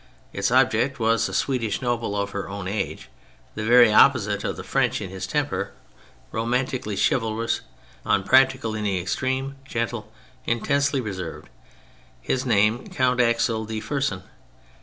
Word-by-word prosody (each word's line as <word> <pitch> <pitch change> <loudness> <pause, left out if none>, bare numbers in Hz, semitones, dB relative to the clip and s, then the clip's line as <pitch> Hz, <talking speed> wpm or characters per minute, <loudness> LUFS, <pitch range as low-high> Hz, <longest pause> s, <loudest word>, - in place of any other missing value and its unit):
Its - - 0
object 135 -1 +2
was 115 0 +2
a - - -7
Swedish 115 -6 -1
noble 120 -5 -2
of 100 0 -2
her 100 -1 -5
own 100 -1 -5
age, 100 +2 -3 0.5
the 105 - -4
very 120 -1 +6
opposite 105 -5 +4
of - - -3
the - - -6
French - - 0
in 95 - -6
his 95 0 -5
temper, - - -2 0.6
romantically 120 -1 -1
chivalrous, 115 -1 0 0.4
un 100 - +1
practical 130 -1 +3
in 110 -1 -3
the 100 -3 0
extreme, 130 +9 -2
gentle, 115 -4 -4 0.4
intensely 140 +4 +1
reserved; 95 - -6 0.7
his 130 - -2
name 110 +1 +2
Count 125 -1 +1
Axel 115 -1 +1
de 110 0 -4
Fersen. 135 -7 -2
115 Hz, 140 wpm, -24 LUFS, 105-130 Hz, 0.7 s, very